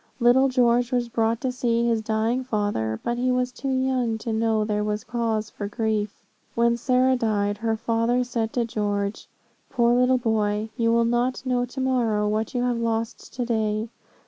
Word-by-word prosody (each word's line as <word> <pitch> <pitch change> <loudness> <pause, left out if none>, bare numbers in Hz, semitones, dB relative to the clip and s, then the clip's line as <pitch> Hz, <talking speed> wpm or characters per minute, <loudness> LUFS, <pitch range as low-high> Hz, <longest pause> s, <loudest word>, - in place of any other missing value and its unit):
Little 255 +3 +5
George 245 -1 +2
was 245 -1 0
brought 225 0 0
to 260 - -1
see 235 -2 0
his 230 -2 +1
dying 220 +3 0
father, 205 - -1
but 240 0 -2
he 255 +1 +1
was 250 0 0
too 265 +2 -5
young 260 -3 0
to 225 0 -4
know 220 -1 +1
there 210 -1 -1
was 210 +1 -2
cause 225 -3 -2
for 205 - -5
grief 215 -1 -2 0.3
When 235 0 +3
Sarah 255 +2 +2
died, 205 -3 0
her 225 -1 0
father 230 +2 +1
said 230 -2 -2
to 240 -2 +1
George, 205 -2 -2 0.4
'Poor 240 -3 +2
little 250 +1 +4
boy, 215 -2 0
you 230 -2 +1
will 230 0 +3
not 240 +3 0
know 250 -1 +1
to 250 +2 -8
morrow 235 -5 +1
what 215 +3 -2
you 245 - +1
have 245 -1 0
lost 230 0 -3
to 250 -1 -2
day.' 220 -1 -1
230 Hz, 185 wpm, -24 LUFS, 220-245 Hz, 0.4 s, Little